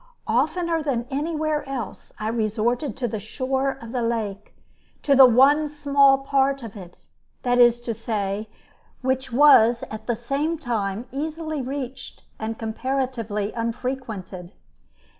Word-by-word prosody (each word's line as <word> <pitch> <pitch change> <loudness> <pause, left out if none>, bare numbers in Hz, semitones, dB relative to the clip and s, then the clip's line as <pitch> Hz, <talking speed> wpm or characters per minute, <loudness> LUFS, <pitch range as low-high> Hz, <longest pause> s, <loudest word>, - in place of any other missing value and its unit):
Oftener 325 +8 +1
than 260 -6 -1
anywhere 305 +1 -1
else 250 -6 -6
I 215 - -3
resorted 230 +4 -1
to 250 -2 -1
the 220 -1 -4
shore 265 +5 -2
of 230 0 -9
the 250 -1 -1
lake, 215 -3 -3 0.5
to 280 - +4
the 265 -1 +9
one 275 +6 +5
small 280 -2 +4
part 275 -1 +1
of 225 -2 -8
it, 180 -4 -12 0.4
that 245 0 +2
is 240 -1 +6
to 240 -1 -3
say, 210 -2 -3 0.5
which 260 0 -1
was 240 -3 +6
at 220 0 -8
the 240 - +1
same 275 +8 -2
time 225 -6 -2
easily 310 +1 -3
reached 260 0 -6 0.2
and 220 0 -4
comparatively 225 -3 -2
unfrequented. 230 -6 -5
245 Hz, 135 wpm, -24 LUFS, 220-275 Hz, 0.5 s, the